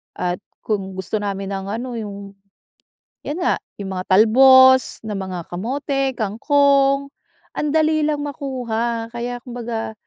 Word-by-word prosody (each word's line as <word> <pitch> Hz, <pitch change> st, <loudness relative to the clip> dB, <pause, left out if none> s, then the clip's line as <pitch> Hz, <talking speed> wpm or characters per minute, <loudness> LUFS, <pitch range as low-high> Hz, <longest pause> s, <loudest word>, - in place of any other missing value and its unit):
At 175 Hz, 0 st, -2 dB, 0.2 s
kung 195 Hz, -3 st, -3 dB
gusto 190 Hz, +3 st, -3 dB
namin 200 Hz, -1 st, -4 dB
ng 195 Hz, 0 st, -4 dB
ano 235 Hz, +4 st, -4 dB
yung 200 Hz, -2 st, -7 dB, 0.9 s
'yan 300 Hz, +5 st, -4 dB
nga, -, -, +2 dB, 0.2 s
yung 195 Hz, -1 st, -5 dB
mga 185 Hz, -, -3 dB
talbos 260 Hz, +6 st, +6 dB
ng 210 Hz, -2 st, -4 dB
mga 190 Hz, -2 st, -5 dB
kamote, 270 Hz, +7 st, -2 dB
kangkong, 275 Hz, +5 st, +2 dB, 0.5 s
ang 300 Hz, -, -1 dB
dali 310 Hz, -1 st, +2 dB
lang 300 Hz, -1 st, 0 dB
makuha. 240 Hz, -5 st, -3 dB
Kaya 240 Hz, +1 st, -4 dB
kumbaga, 235 Hz, -3 st, -5 dB
235 Hz, 130 wpm, -20 LUFS, 200-275 Hz, 0.9 s, talbos